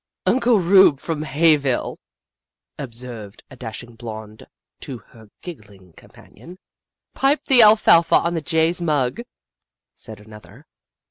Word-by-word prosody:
" - - -69
Uncle 245 -3 +2
Rube, 185 -5 +4
from 160 -1 -5
Hayville," 145 -3 0 0.8
observed 120 -5 -9
a - - -12
dashing 120 -1 -9
blonde 110 -2 -10 0.3
to 130 - -7
her 110 0 -19 0.2
giggling 100 - -13
companion. 175 - -17 0.3
" - - -66
Pipe 280 +3 0
the 260 -4 +5
alfalfa 210 -6 +5
on 170 - +1
the 165 - -3
jay's 160 +2 0
mug," 150 - -1 0.7
said 110 -3 -12
an 105 +1 -16
other. 105 - -16
140 Hz, 130 wpm, -20 LUFS, 110-170 Hz, 0.8 s, the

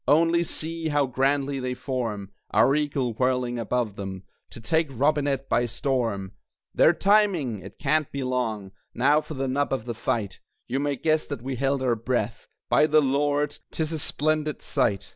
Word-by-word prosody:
Only 165 +3 +4
see 165 0 -3
how 145 -1 +2
grandly 135 +2 0
they 125 -1 -3
form 115 -8 -3 0.2
(Our 110 +6 +4
eagle 140 -5 0
whirling 125 0 0
above 115 -2 -1
them), 95 -1 -6 0.3
To - - -10
take 160 +8 +1
Robinett 140 0 +1
by 120 0 +2
storm! 115 -7 -1 0.4
They're - - +6
timing! 180 - +2
it 95 +2 -11
can't 155 -2 +1
be 140 -1 -3
long 110 -6 -2 0.2
Now 145 +5 +4
for 155 - -8
the 135 0 -2
nub 140 +2 0
of 130 -4 -2
the 120 - -3
fight! 110 -3 -2 0.3
(You 130 +3 -1
may 145 0 0
guess 155 +3 +1
that 140 -5 -5
we 135 0 -3
held 135 +1 0
our 125 -2 +2
breath.) 115 -1 -2 0.2
By 155 - +4
the 155 0 +5
Lord, 145 +1 +1
'tis 160 -1 -2
a 160 - -2
splendid 155 +1 -1
sight! 110 -9 0
135 Hz, 175 wpm, -25 LUFS, 120-150 Hz, 0.4 s, They're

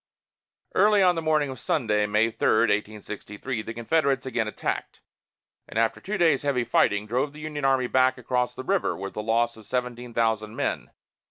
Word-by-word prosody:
Early 210 -1 +5
on 180 -1 +5
the 165 - -3
morning 155 -3 +1
of 130 - -8
Sunday, 105 -8 +1
May 105 +2 +2
3, 110 - +2
1863, 105 +2 -2
the 115 - -7
Confederates 140 +3 +1
again 120 -4 -1
attacked, 110 - -4 0.7
and - - -7
after 115 0 +1
two 210 +3 -3
days' 160 -6 +3
heavy 140 -4 0
fighting, 105 -3 +2
drove 130 +6 -1
the 150 - -11
Union 150 -2 -4
army 135 -2 +3
back 130 +1 +3
across 125 0 -1
the 130 - -6
river, 195 +4 0
with 100 +1 -6
a 105 - -2
loss 115 +2 +1
of 110 - -15
seventeen 125 -1 -3
thousand 110 -1 0
men. - - -2
125 Hz, 180 wpm, -26 LUFS, 110-140 Hz, 0.7 s, Early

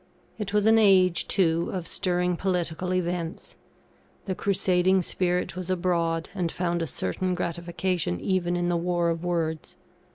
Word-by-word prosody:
It 205 -2 -3
was 210 0 +2
an 225 0 +6
age, 185 -4 +4
too, 170 -3 +1
of 180 -3 -4
stirring 180 -1 0
political 180 -1 -1
events; 175 -2 -3 0.7
the 190 - -1
crusading 185 -1 +2
spirit 180 +1 -1
was 185 -1 -5
abroad, 170 -2 0
and 175 -4 -2
found 175 -1 -1
a 165 - -1
certain 180 - -2
gratification 170 - -2
even 180 -2 0
in 175 0 0
the 175 -1 +1
war 175 0 +1
of 165 +1 -4
words. 165 -3 -2
180 Hz, 150 wpm, -26 LUFS, 170-185 Hz, 0.7 s, an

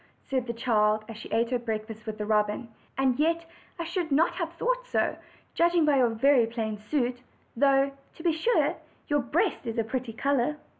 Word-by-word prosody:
said 255 -2 0
the - - -1
child, 215 -3 +2
as 225 - -8
she 220 - -9
ate 230 +2 +1
her 250 - +1
breakfast 220 -1 -5
with 215 -1 -4
the 210 - -3
robin; 210 +2 +1 0.3
"and 265 -1 +2
yet 330 +2 +2 0.3
I 340 - -3
should 340 -1 -3
not 315 +6 +4
have 340 -2 -3
thought - - -1
so, - - +1 0.4
judging 340 -1 +3
by 295 -2 +4
your 250 -2 +4
very 235 +1 +4
plain 220 -2 -3
suit, 245 +2 -1 0.3
though, 275 +2 +4 0.2
to 325 - -11
be 335 - +3
sure, 390 +10 +1 0.3
your 290 0 +3
breast 240 -1 0
is 230 - -3
a 230 - +2
pretty 240 +1 -4
color." 280 +3 +1
255 Hz, 195 wpm, -28 LUFS, 225-305 Hz, 0.4 s, not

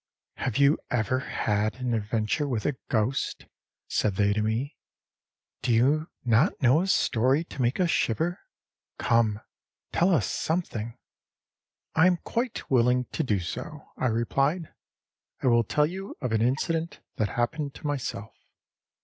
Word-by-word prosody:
âHave 125 -5 -1
you 140 +2 +4
ever 125 +2 +1
had 105 -5 -1
an 125 -2 -2
adventure 110 +6 0
with 115 -6 -2
a 145 - +1
ghost?â 115 +3 -1 0.4
said 105 -3 0
they 100 +1 +3
to 110 - 0
me. 110 +7 -1 0.9
âDo - - -2
you 145 +7 +2 0.2
not 120 - +3
know 135 +4 +4
a 190 - -1
story 130 -3 +2
to 140 - -7
make 120 +6 +1
us 180 -2 +3
shiver? 120 - 0 0.6
Come, 115 -3 +2 0.5
tell 175 +3 +3
us 145 - +3
something.â 120 -9 -2 1.0
âI 160 +3 +6
am 180 -1 +3
quite 235 0 -2
willing 125 0 +3
to - - -1
do 110 -10 +1
so,â 130 - -6 0.2
I - - +4
replied. 135 +8 0 0.7
âI 130 - +4
will 120 0 +4
tell 150 +7 +2
you 190 +5 -6
of 125 -4 -3
an 110 -1 +2
incident 160 +7 0 0.2
that 110 - +1
happened 140 +4 -1
to - - -11
myself. 130 -7 -3
125 Hz, 150 wpm, -27 LUFS, 110-150 Hz, 1.0 s, âI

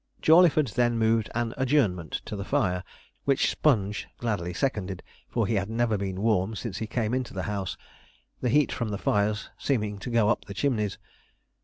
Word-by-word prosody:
Jawleyford 160 -3 +5
then 120 -1 +1
moved 110 -1 +2
an 120 -1 -1
adjournment 125 - +1
to - - -5
the 100 - -4
fire; 95 -8 0 0.4
which 140 -1 +3
Sponge 105 -8 +1
gladly 105 -7 -2
seconded, 95 -2 -2 0.3
for - - 0
he 115 - -1
had 100 -1 0
never 115 0 +1
been 95 -1 -3
warm 110 -1 +2
since 110 -4 -5
he 110 - -3
came 115 0 -1
into 130 -4 -2
the 95 - -2
house, 100 -3 -3 0.6
the 125 - +1
heat 145 +3 +3
from 115 -3 -2
the 100 - -2
fires 105 +1 0
seeming 105 -7 -1
to 110 - -6
go 115 -3 +3
up 120 - 0
the 100 - -8
chimneys. 105 -8 0
110 Hz, 180 wpm, -27 LUFS, 100-125 Hz, 0.6 s, Jawleyford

